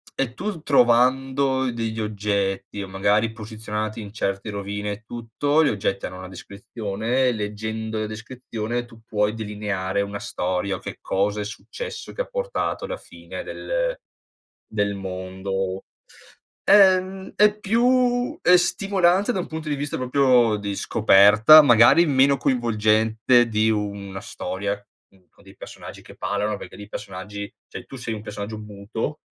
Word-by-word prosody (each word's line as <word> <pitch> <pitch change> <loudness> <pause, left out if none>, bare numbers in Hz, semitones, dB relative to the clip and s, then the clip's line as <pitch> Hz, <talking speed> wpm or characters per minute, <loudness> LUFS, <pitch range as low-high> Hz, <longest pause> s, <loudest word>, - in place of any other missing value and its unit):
e 130 -3 -1
tu 190 -2 -5
trovando 130 +1 +3
degli 115 -1 -3
oggetti 100 -1 -2
o 95 - -8
magari 105 +3 +1
posizionati 110 0 -5
in 100 -1 -9
certe 100 -1 -3
rovine 100 0 -4
e 100 +3 -7
tutto, 145 +7 0
gli 145 - +3
oggetti 100 -3 -2
hanno 90 - -9
una 95 0 -8
descrizione, 105 +6 -2
leggendo 110 0 -4
la 110 - -1
descrizione 115 +1 -5
tu 120 -2 -16
puoi 105 -1 0
delineare 105 -3 -2
una 100 0 -4
storia 95 +2 -2
o - - -7
che - - -7
cosa 100 +2 -1
è 105 - -3
successo 455 - -7
che - - -4
ha - - -16
portato - - -3
alla - - -4
fine - - -9
del - - -2 0.8
del 100 -1 0
mondo. 95 0 -4 0.8
Ehm, 190 -1 +4
è 210 0 +4
più 245 +5 +2
ehm 180 - +6
stimolante 190 +2 +2
da 190 - -1
un 180 - -3
punto 160 -1 -6
di 145 - 0
vista 145 +1 -3
proprio 125 -3 +3
di 100 -1 -4
scoperta, 105 +7 +7
magari 120 +7 +6
meno 140 0 +4
coinvolgente 115 -1 +2
di 110 0 +2
una 100 -2 -4
storia, 100 +1 -4 0.3
uhm, 95 -2 -27
con - - -24
dei - - -16
personaggi - - -10
che - - -14
parlano, 100 +2 -1
perché - - -10
lì 105 - -9
i 100 - -12
personaggi 100 0 -7 0.2
cioè - - -8
tu 135 - -10
sei 120 -2 -4
un 105 - -7
personaggio 105 +1 -6
muto 105 +7 -5
110 Hz, 150 wpm, -23 LUFS, 100-135 Hz, 0.8 s, scoperta